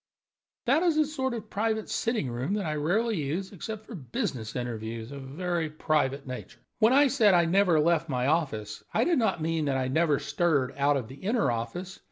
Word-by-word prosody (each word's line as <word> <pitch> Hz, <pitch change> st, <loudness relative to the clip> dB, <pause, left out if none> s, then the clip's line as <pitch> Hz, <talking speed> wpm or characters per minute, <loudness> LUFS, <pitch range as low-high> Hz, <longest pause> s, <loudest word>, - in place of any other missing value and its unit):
"That 275 Hz, +6 st, +3 dB
is 340 Hz, -3 st, +2 dB
a 310 Hz, -, +4 dB
sort 265 Hz, -4 st, -2 dB
of 215 Hz, -2 st, -8 dB
private 220 Hz, +1 st, -1 dB
sitting 225 Hz, -, -1 dB
room 130 Hz, +11 st, -2 dB
that 205 Hz, -3 st, -2 dB
I 155 Hz, -, -1 dB
rarely 200 Hz, +9 st, +1 dB
use, 165 Hz, +7 st, -3 dB
except 215 Hz, +3 st, -7 dB
for 235 Hz, -, -10 dB
business 120 Hz, -, -4 dB
interviews 115 Hz, -1 st, -4 dB
of 140 Hz, -1 st, -7 dB
a -, -, -9 dB
very 170 Hz, +2 st, -2 dB
private 145 Hz, -3 st, 0 dB
nature. 125 Hz, -1 st, -7 dB, 0.2 s
When 220 Hz, +1 st, +5 dB
I 280 Hz, +3 st, +6 dB
said 230 Hz, -8 st, +4 dB
I 170 Hz, -1 st, +4 dB
never 180 Hz, -1 st, +4 dB
left 165 Hz, +1 st, +2 dB
my 125 Hz, -2 st, 0 dB
office, 130 Hz, -9 st, -1 dB
I -, -, +4 dB
did 340 Hz, -5 st, +2 dB
not 220 Hz, -8 st, +1 dB
mean 165 Hz, -1 st, 0 dB
that 135 Hz, -2 st, +1 dB
I 130 Hz, -1 st, -1 dB
never 155 Hz, +1 st, +2 dB
stirred 140 Hz, -7 st, 0 dB
out 140 Hz, +1 st, +2 dB
of 125 Hz, -5 st, -4 dB
the 130 Hz, +3 st, -11 dB
inner 205 Hz, -, +1 dB
office. 120 Hz, +12 st, -5 dB
165 Hz, 210 wpm, -28 LUFS, 135-215 Hz, 0.2 s, I